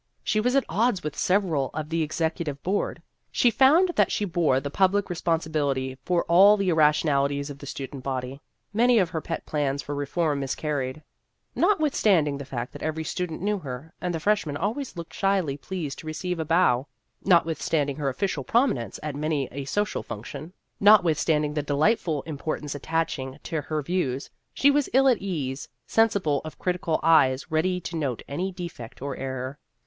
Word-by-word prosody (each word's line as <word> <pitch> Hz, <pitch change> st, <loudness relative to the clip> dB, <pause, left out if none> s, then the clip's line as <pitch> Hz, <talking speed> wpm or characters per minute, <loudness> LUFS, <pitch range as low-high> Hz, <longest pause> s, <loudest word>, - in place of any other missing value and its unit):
She 215 Hz, -, +1 dB
was 250 Hz, +4 st, +1 dB
at 275 Hz, -, +3 dB
odds 215 Hz, -2 st, +1 dB
with 150 Hz, -, -4 dB
several 175 Hz, -9 st, +1 dB
on 155 Hz, -1 st, -4 dB
the 165 Hz, 0 st, 0 dB
Ex 155 Hz, 0 st, -5 dB
ecutive 160 Hz, -3 st, -1 dB
Board. 195 Hz, +3 st, -1 dB, 0.3 s
She 245 Hz, -, +3 dB
found 285 Hz, -, +5 dB
that -, -, +4 dB
she 210 Hz, -, 0 dB
bore 170 Hz, -7 st, +2 dB
the 140 Hz, +1 st, -5 dB
public 195 Hz, +3 st, +2 dB
responsibility 155 Hz, -6 st, -1 dB
for 175 Hz, -2 st, +1 dB
all 195 Hz, +5 st, +6 dB
the 195 Hz, -2 st, 0 dB
irra 155 Hz, -3 st, +6 dB
tionalities 140 Hz, -1 st, 0 dB
of 140 Hz, -, -10 dB
the 140 Hz, -, -9 dB
student 135 Hz, 0 st, -6 dB
body. 130 Hz, +1 st, -4 dB, 0.3 s
Many 240 Hz, +3 st, +4 dB
of 180 Hz, -6 st, +2 dB
her 160 Hz, -, -2 dB
pet 165 Hz, -, -5 dB
plans 145 Hz, -2 st, -1 dB
for 145 Hz, -, -5 dB
reform 145 Hz, +1 st, -1 dB
miscarried. 140 Hz, 0 st, -3 dB, 0.5 s
Not 385 Hz, +2 st, +3 dB
withstanding 185 Hz, -, +2 dB
the 140 Hz, -, -6 dB
fact 125 Hz, -2 st, -5 dB
that -, -, -9 dB
every 155 Hz, +1 st, -2 dB
student 175 Hz, +1 st, -4 dB
knew 205 Hz, 0 st, 0 dB
her, 140 Hz, +1 st, -8 dB
and 180 Hz, -, -1 dB
the 165 Hz, -, -2 dB
freshmen 185 Hz, -5 st, 0 dB
always 220 Hz, -, -3 dB
looked 170 Hz, -1 st, -7 dB
shyly 195 Hz, -8 st, +1 dB
pleased 150 Hz, -1 st, -5 dB
to 155 Hz, -, -10 dB
receive 175 Hz, +3 st, -3 dB
a 160 Hz, -, -1 dB
bow, 155 Hz, -5 st, +3 dB, 0.4 s
notwith 170 Hz, -4 st, +3 dB
standing 145 Hz, -3 st, 0 dB
her 145 Hz, -3 st, 0 dB
official 150 Hz, +1 st, -2 dB
prominence 230 Hz, -, +1 dB
at 150 Hz, -2 st, -4 dB
many 150 Hz, -2 st, -1 dB
a 140 Hz, +1 st, -5 dB
social 205 Hz, +8 st, -1 dB
function, 140 Hz, +9 st, -8 dB, 0.3 s
notwithstanding 160 Hz, -7 st, +4 dB
the 150 Hz, -, 0 dB
delightful 150 Hz, -, +1 dB
importance 150 Hz, -1 st, -4 dB
attaching 145 Hz, -3 st, -2 dB
to 160 Hz, -3 st, -2 dB
her 155 Hz, +1 st, -3 dB
views, 140 Hz, -6 st, -2 dB, 0.2 s
she 285 Hz, -, +4 dB
was 290 Hz, -1 st, +1 dB
ill 270 Hz, +1 st, +5 dB
at 250 Hz, -5 st, +4 dB
ease 145 Hz, -9 st, -4 dB, 0.2 s
sensible 200 Hz, -, +2 dB
of 155 Hz, -, -8 dB
crit 180 Hz, -1 st, -2 dB
ical 160 Hz, -2 st, 0 dB
eyes 135 Hz, -5 st, +4 dB
ready 180 Hz, +4 st, +1 dB
to 170 Hz, -, -6 dB
note 140 Hz, -7 st, -2 dB
any 180 Hz, +7 st, -2 dB
defect 170 Hz, -11 st, -8 dB
or 140 Hz, 0 st, -4 dB
error. 130 Hz, +1 st, -5 dB
160 Hz, 185 wpm, -26 LUFS, 140-185 Hz, 0.5 s, all